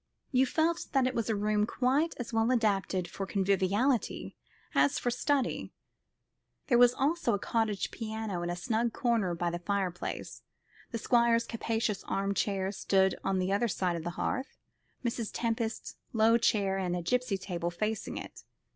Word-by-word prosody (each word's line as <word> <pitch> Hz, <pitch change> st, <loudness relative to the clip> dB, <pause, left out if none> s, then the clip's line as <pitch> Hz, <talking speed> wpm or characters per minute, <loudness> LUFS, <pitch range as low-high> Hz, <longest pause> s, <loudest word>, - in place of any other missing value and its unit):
You 260 Hz, 0 st, +4 dB
felt 330 Hz, +4 st, +1 dB
that 270 Hz, -2 st, +4 dB
it 255 Hz, -, 0 dB
was 230 Hz, -2 st, -1 dB
a 220 Hz, -, +2 dB
room 210 Hz, +1 st, +1 dB
quite 270 Hz, +7 st, +1 dB
as 240 Hz, -1 st, -6 dB
well 225 Hz, +1 st, +2 dB
adapted 200 Hz, -6 st, +1 dB
for 195 Hz, -, -5 dB
conviviality 200 Hz, +6 st, +1 dB, 0.4 s
as 285 Hz, -, +3 dB
for 245 Hz, -, 0 dB
study. 265 Hz, +1 st, 0 dB, 1.0 s
There 240 Hz, -2 st, +5 dB
was 245 Hz, 0 st, +6 dB
a 275 Hz, -6 st, +1 dB
cottage 215 Hz, -1 st, -1 dB
piano 220 Hz, -5 st, -4 dB
in 175 Hz, -, -2 dB
a 175 Hz, -, -1 dB
snug 225 Hz, +5 st, 0 dB
corner 225 Hz, -8 st, +1 dB
by 170 Hz, 0 st, -1 dB
the 175 Hz, -, -3 dB
fireplace. 185 Hz, -1 st, -3 dB, 0.5 s
The 230 Hz, -, -3 dB
Squire's 235 Hz, 0 st, +3 dB
capacious 225 Hz, -3 st, -2 dB
arm 195 Hz, 0 st, -1 dB
chair 195 Hz, 0 st, 0 dB
stood 190 Hz, -1 st, +2 dB
on 195 Hz, -1 st, +1 dB
the 185 Hz, +1 st, 0 dB
other 235 Hz, +4 st, +2 dB
side 180 Hz, -3 st, 0 dB
of 165 Hz, -, -4 dB
the 175 Hz, -, -2 dB
hearth, 270 Hz, 0 st, -2 dB, 0.5 s
Mrs. 230 Hz, -2 st, -1 dB
Tempest's 230 Hz, -1 st, -2 dB, 0.2 s
low 225 Hz, 0 st, +5 dB
chair 195 Hz, -4 st, +2 dB
and 180 Hz, -2 st, -2 dB
gipsy 250 Hz, -1 st, +1 dB
table 175 Hz, -3 st, -3 dB
facing 215 Hz, +5 st, -3 dB
it. -, -, -8 dB
220 Hz, 160 wpm, -30 LUFS, 190-240 Hz, 1.0 s, was